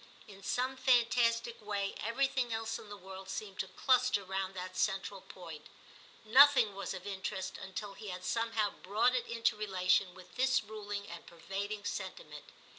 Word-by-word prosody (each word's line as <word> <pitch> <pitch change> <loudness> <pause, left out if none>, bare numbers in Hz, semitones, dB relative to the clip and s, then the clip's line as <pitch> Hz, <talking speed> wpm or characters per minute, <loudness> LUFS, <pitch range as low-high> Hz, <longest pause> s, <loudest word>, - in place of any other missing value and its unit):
In 195 -1 -12
some 255 +5 -1
fantastic 235 -2 +3
way 200 -1 -1
every 230 +5 +1
thing 260 -3 -1
else 225 0 -2
in 210 - -12
the 205 - -7
world 190 0 -10
seemed 200 0 -5
to 190 - -1
cluster 225 +1 +3
round 190 0 -2
that 185 0 -6
central 195 0 -1
point; 165 -5 -10 0.6
nothing 255 -2 +7
was 195 0 -4
of 185 0 -8
interest 190 -1 -4
until 195 +2 -6
he 210 - -9
had 180 -1 -5
somehow 230 -2 +1
brought 210 +6 +1
it 245 -2 0
into 230 -1 +1
relation 190 -2 +1
with 185 -1 -14
this 260 -1 +3
ruling 205 -1 -5
and 170 0 -9
pervading 200 +4 -5
sentiment. - - -5
205 Hz, 165 wpm, -33 LUFS, 190-230 Hz, 0.6 s, nothing